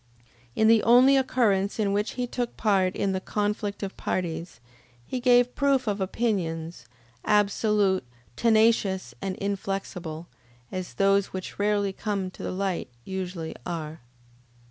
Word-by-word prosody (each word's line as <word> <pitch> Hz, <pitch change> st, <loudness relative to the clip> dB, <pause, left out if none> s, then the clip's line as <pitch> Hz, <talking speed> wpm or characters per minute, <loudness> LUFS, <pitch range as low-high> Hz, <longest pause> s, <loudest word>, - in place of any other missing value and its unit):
In 220 Hz, -, +3 dB
the 225 Hz, -1 st, +6 dB
only 250 Hz, +4 st, +6 dB
occurrence 220 Hz, -7 st, +2 dB
in 205 Hz, -3 st, +1 dB
which 205 Hz, +2 st, -1 dB
he 250 Hz, -, -2 dB
took 245 Hz, 0 st, -4 dB
part 195 Hz, -4 st, +2 dB
in 195 Hz, -, 0 dB
the 190 Hz, -, -1 dB
conflict 205 Hz, 0 st, -2 dB
of 195 Hz, -, -5 dB
parties, 170 Hz, -5 st, -3 dB, 0.5 s
he 255 Hz, -, -3 dB
gave 245 Hz, 0 st, +4 dB
proof 275 Hz, -2 st, +2 dB
of 205 Hz, -2 st, -1 dB
opinions, 170 Hz, -, -2 dB, 0.4 s
absolute, 205 Hz, -2 st, +2 dB, 0.3 s
tenacious, 220 Hz, -4 st, +2 dB
and 195 Hz, -1 st, -3 dB
inflexible, 190 Hz, -5 st, -4 dB, 0.5 s
as 185 Hz, -1 st, -5 dB
those 195 Hz, 0 st, +3 dB
which 185 Hz, +1 st, -6 dB
rarely 205 Hz, -1 st, +1 dB
come 195 Hz, -2 st, -3 dB
to -, -, -12 dB
the -, -, -3 dB
light 190 Hz, -4 st, -2 dB, 0.2 s
usually 180 Hz, -3 st, -5 dB
are. 160 Hz, -2 st, -5 dB
200 Hz, 135 wpm, -26 LUFS, 185-220 Hz, 0.5 s, the